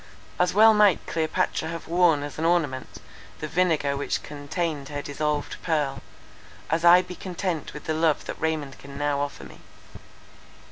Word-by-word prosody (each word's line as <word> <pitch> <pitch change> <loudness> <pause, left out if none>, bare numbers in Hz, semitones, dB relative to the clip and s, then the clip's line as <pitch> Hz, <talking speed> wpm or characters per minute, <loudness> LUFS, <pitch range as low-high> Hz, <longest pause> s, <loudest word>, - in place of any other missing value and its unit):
As 180 0 +3
well 220 +3 +7
might 210 -4 +4
Cleopatra 160 0 -1
have 165 0 -6
worn 170 -4 +3
as 145 +1 -7
an - - -2
ornament 160 -7 0 0.4
the 155 - -4
vinegar 160 -5 +1
which 140 - -2
contained 145 0 -4
her 145 -1 -5
dissolved 150 0 -2
pearl, 150 -5 -1 0.7
as 165 +1 +1
I 175 +1 +7
be 180 0 -8
content 180 -5 -4
with 150 - -8
the 160 - -2
love 160 -1 +1
that - - -7
Raymond 155 -4 -2
can 140 0 -11
now 145 -1 0
offer 145 0 -4
me." - - -13
160 Hz, 160 wpm, -25 LUFS, 145-175 Hz, 0.7 s, well